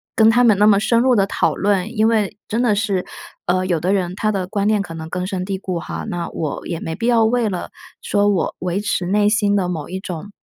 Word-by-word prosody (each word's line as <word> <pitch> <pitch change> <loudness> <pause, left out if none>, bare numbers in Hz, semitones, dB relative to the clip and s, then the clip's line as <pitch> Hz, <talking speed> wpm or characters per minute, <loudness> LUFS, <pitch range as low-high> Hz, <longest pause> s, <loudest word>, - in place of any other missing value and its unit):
跟 220 0 +6
他 245 +2 +4
们 220 -4 +5
那 210 - +5
么 200 -2 +5
深 230 +2 +2
入 255 -1 +4
地 195 - +3
讨 - - 0
论， 205 +3 0
因 215 +1 +4
为 215 -2 0
真 230 +3 -1
的 230 -4 +3
是， 200 -3 0 0.4
呃， 185 +1 +1
有 175 -4 0
的 185 +4 0
人 180 -3 -1
他 215 0 0
的 190 -3 -2
观 200 +1 -1
念 215 -1 +3
可 165 - -9
能 160 0 -7
根 180 +1 -3
深 185 -1 -3
蒂 195 0 -3
固 185 -2 -4
哈， - - -6
那 175 -1 -3
我 155 -3 -4
也 170 -2 -3
没 160 0 -4
必 230 - -2
要 235 -2 +4
为 230 -1 +1
了 180 -2 -4 0.3
说 205 0 +2
我 190 -5 0
维 180 +2 -2
持 195 -3 -1
内 205 +2 +2
心 210 -1 +2
的 185 -3 +1
某 160 -4 -4
一 190 +1 -4
种 190 +2 -7
200 Hz, 275 characters per minute, -20 LUFS, 180-215 Hz, 0.4 s, 跟